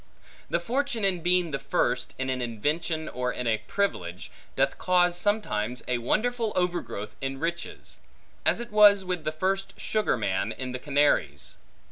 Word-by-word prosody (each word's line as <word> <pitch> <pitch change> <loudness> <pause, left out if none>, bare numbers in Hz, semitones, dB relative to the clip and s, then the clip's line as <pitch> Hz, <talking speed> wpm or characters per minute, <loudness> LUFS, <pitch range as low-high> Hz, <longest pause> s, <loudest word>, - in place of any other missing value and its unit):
The - - +1
fortune 250 -3 -1
in 185 -3 +1
being 175 -1 +2
the 140 - -2
first, 125 -1 0
in 130 0 -1
an 130 -1 -2
invention 150 +7 -1
or 125 0 -2
in 125 - -4
a 110 -2 +2
privilege, 100 - -2 0.2
doth 135 +1 +1
cause 180 -1 +3
sometimes 125 - 0
a 125 -1 0
wonderful 225 - 0
overgrowth 175 - -2
in 135 0 -3
riches; 170 +2 -4 0.4
as - - +2
it 235 -1 -6
was 205 -2 +7
with 180 -3 -2
the 155 - +1
first 190 +5 -2
sugar 215 - +1
man, 100 0 -1
in 130 -1 -5
the 130 - -4
Canaries. 140 - +1
155 Hz, 160 wpm, -27 LUFS, 125-195 Hz, 0.4 s, was